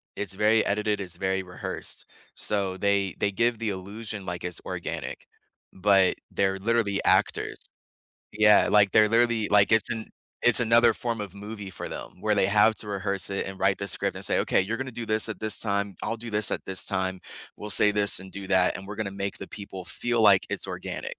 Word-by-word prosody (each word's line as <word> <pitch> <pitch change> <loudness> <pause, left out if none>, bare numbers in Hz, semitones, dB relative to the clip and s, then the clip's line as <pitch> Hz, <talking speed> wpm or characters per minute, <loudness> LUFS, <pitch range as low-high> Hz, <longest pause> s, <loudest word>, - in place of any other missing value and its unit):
It's 100 -2 -3
very 105 +3 +3
edited, 105 0 0
it's 90 -3 -5
very 95 0 -1
rehearsed. 90 0 -6 0.3
So, 100 -3 -1
they 100 -2 +1
they 100 - +1
give 115 +3 +1
the 115 - -1
illusion 100 +1 -6
like 90 0 -5
it's 90 -1 -2
organic, - - -5 0.4
but 95 -1 +3 0.2
they're 95 0 0
literally 105 -1 0
actors. - - +1 0.7
Yeah, 105 0 +5
like, 100 -2 +4
they're 105 -1 +5
literally 115 -1 +2
like, 100 0 +4
it's 110 -2 +4
an 110 -1 -2 0.4
it's 120 +1 +6
another 115 0 +5
form 115 -2 -3
of 100 -2 -7
movie 105 -1 -8
for - - -6
them, - - -7
where 105 +1 +1
they 95 -2 +3
have 105 +2 +4
to 105 - -6
rehearse 100 -1 -2
it, 100 - -2
and 95 0 -8
write 95 - +2
the 100 - -4
script, 90 - -1
and - - -5
say, - - +2
"Okay, - - +2
you're 105 +5 -2
gonna 130 +1 -5
do 115 0 -6
this 110 +1 0
at 110 - -5
this 110 -1 -1
time. 100 -2 -1
I'll 115 - -3
do 115 0 -6
this 105 0 0
at - - -2
this 95 -1 -2
time. 95 -1 -2 0.4
We'll 105 - -7
say 105 +1 +5
this 100 -2 +1
and 95 0 -11
do 100 0 -8
that, 95 -2 +3
and 95 - -10
we're 105 - -7
gonna 110 -3 -3
make 100 0 -4
the - - -8
people 95 -3 -8
feel 120 -1 -1
like 100 -3 +5
it's - - -1
organic." - - -5
100 Hz, 210 wpm, -26 LUFS, 95-110 Hz, 0.7 s, it's